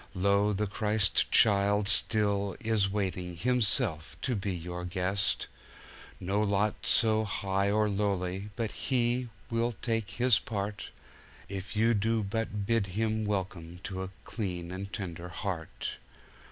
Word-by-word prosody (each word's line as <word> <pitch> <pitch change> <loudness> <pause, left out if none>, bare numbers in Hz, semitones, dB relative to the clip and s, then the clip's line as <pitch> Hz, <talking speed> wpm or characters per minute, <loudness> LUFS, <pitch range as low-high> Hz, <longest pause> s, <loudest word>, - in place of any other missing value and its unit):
Lo! 100 +2 +3
the 105 +1 0
Christ 105 -1 +2
child 100 -1 +4
still 100 -2 +3
is 110 -3 +1
waiting 95 -3 -2
Himself 110 - +1
to 125 - 0
be 100 -1 -2
your 90 0 -5
guest; 95 +2 +1 0.7
No 100 +3 0
lot 105 0 +2
so 110 -1 +3
high 100 -1 0
or 105 +1 +2
lowly 100 -1 -1
but 115 -1 -2
He 125 -1 0 0.2
will 115 +1 +1
take 115 -1 -2
His 120 +1 +3
part, 105 -1 -4 0.6
If 95 +1 -6
you 115 +2 +4
do 110 +1 +1
but 105 0 -2
bid 115 -2 +1
Him 110 -1 0
welcome 95 -4 -3
to 95 -1 -4
a 95 - -4
clean 90 -5 -4
and 100 +2 -6
tender 90 -4 -5
heart. 90 -2 -4
100 Hz, 135 wpm, -30 LUFS, 95-110 Hz, 0.7 s, child